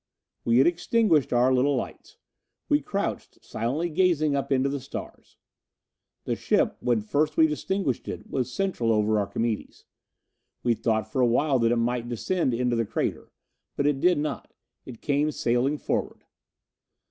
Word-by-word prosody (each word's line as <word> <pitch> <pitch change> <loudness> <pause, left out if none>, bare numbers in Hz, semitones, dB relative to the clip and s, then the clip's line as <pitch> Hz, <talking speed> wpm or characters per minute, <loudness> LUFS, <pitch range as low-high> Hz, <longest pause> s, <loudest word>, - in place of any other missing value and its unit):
We 115 0 +3
had 130 - +6
extinguished 175 - +2
our 125 +2 +3
little 135 +3 +2
lights. 125 - -6 0.5
We - - +3
crouched, - - -4
silently 135 +10 -2
gazing 160 -4 +2
up 140 0 -2
into 135 0 +3
the 140 0 -2
stars. 135 - -9 0.9
The - - -1
ship, - - +1
when 120 -3 +1
first 145 +8 0
we 160 - +7
distinguished 155 - -2
it - - -6
was 130 -2 -2
central 125 -9 0
over 105 0 +2
Archimedes. 110 +2 -3 0.8
We 120 - +3
thought 110 -1 -1
for 130 - 0
a 125 - +5
while 135 +3 +2
that 115 0 +2
it - - +3
might 120 0 -1
descend 135 +5 0
into 125 0 0
the 115 - +1
crater. - - -3 0.4
But 140 - -1
it 145 -2 +2
did 180 +3 +3
not; 150 +1 -4 0.3
it 120 -3 -10
came 145 +1 +1
sailing 130 +1 0
forward. - - -3
130 Hz, 160 wpm, -26 LUFS, 120-150 Hz, 0.9 s, we